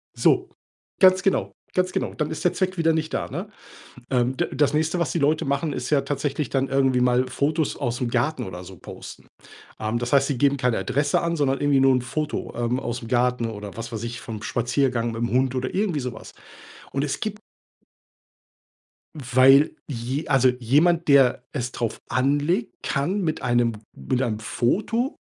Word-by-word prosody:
So - - +2 0.5
Ganz 185 0 +6
genau. 195 - 0 0.2
Ganz 185 0 +1
genau. - - -2
Dann 150 -1 -2
ist 160 - -5
der 180 - +3
Zweck 185 0 -1
wieder 165 -1 +3
nicht 160 0 -2
da, - - -2
ne? - - -5 0.6
Ähm, 125 0 +1
d - - 0
das 145 +1 +2
nächste, 160 +3 +1
was 170 - 0
die - - 0
Leute 150 +2 +2
machen, 140 +3 -1
ist 125 - -4
ja 145 -2 +3
tatsächlich 140 0 -2
dann 135 0 0
irgendwie 135 -2 +2
mal 125 +1 +3
Fotos 150 +4 0
ausm 125 -2 -2
Garten 125 +6 0
oder 90 -1 -8
so 95 +1 -11
posten. - - -11 0.5
Ähm, 110 +2 -1
das 120 0 -4
heißt, 140 -1 +5
sie 140 - -1
geben 140 +2 +2
keine 125 -2 +1
Adresse 145 +1 0
an, 170 0 -1
sondern 135 -3 +1
irgendwie 145 -2 +3
nur 135 0 +5
'n 125 - +1
Foto, 145 +5 -3
ähm, 120 +2 -1
ausm 120 -2 -5
Garten 125 -1 +1
oder 105 -2 -7
was 115 +1 -6
weiß 110 -1 -4
ich, 120 0 -5
vom 110 -2 -7
Spaziergang 120 +2 0
mit 115 +1 -4
'm 120 - 0
Hund 130 +1 +1
oder 130 0 -2
irgendwie 190 -6 0
so 125 -1 -4
was. 110 - -12 0.6
Und 140 - -1
es 145 - -2
gib 215 -1 -4 1.8
Weil 135 +1 +4
je 130 +3 -4
also 135 -2 +4
jemand, 165 +8 +3
der 135 -4 +5
es 125 -3 -3
drauf 115 -2 -3
anlegt, 145 - 0
kann 170 +9 -1
mit 160 -3 -2
einem 120 -1 +2 0.2
mit 120 - -2
einem 110 -5 -1
Foto 215 - -1
135 Hz, 185 wpm, -24 LUFS, 120-150 Hz, 1.8 s, Ganz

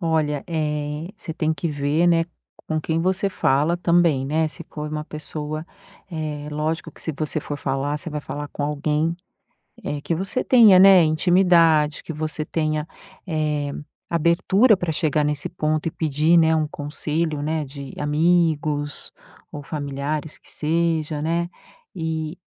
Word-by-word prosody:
Olha, 155 -4 0
eh, 150 0 -2
você 160 - -7
tem 160 -1 0
que 165 +3 -3
ver, 145 +3 +1
né, 165 -1 +4 0.4
com 155 -1 0
quem 160 +1 -1
você 190 +2 +1
fala 155 -1 +1
também, 170 -6 +3
né, 155 +2 +1
se 170 +1 -10
for 150 0 -4
uma 150 0 -3
pessoa, 155 0 -6 0.4
eh, 150 -2 -4
lógico 155 +2 -2
que - - -16
se 160 - -2
você 155 +1 -2
for 145 0 -5
falar, 140 +2 -1
você 165 - -7
vai 150 0 -3
falar 145 0 -6
com 145 - -5
alguém, 150 +2 0 0.7
eh, 145 - -3
que 165 - -1
você 190 +8 -2
tenha, 220 -7 +7
né, 190 -2 +8
intimidade 165 -2 +4
que 165 - -6
você 155 0 -3
tenha, 155 -1 -1 0.4
eh, 150 -3 -1 0.4
abertura 190 +7 +4
pra 175 -3 -2
chegar 155 -1 +1
nesse 150 -1 -1
ponto 155 -2 -1
e - - +1
pedir, 155 +2 +2
né, 160 -1 +4
um 155 -1 +1
conselho, 150 +1 -2
né, 155 0 -1
de 140 -1 -9
amigos 150 -1 +1 0.4
ou 145 - -6
familiares 145 +1 -4
que - - -15
seja, 160 -1 0
né. 170 +2 0 0.5
E 160 0 -3
155 Hz, 155 wpm, -23 LUFS, 150-165 Hz, 0.7 s, né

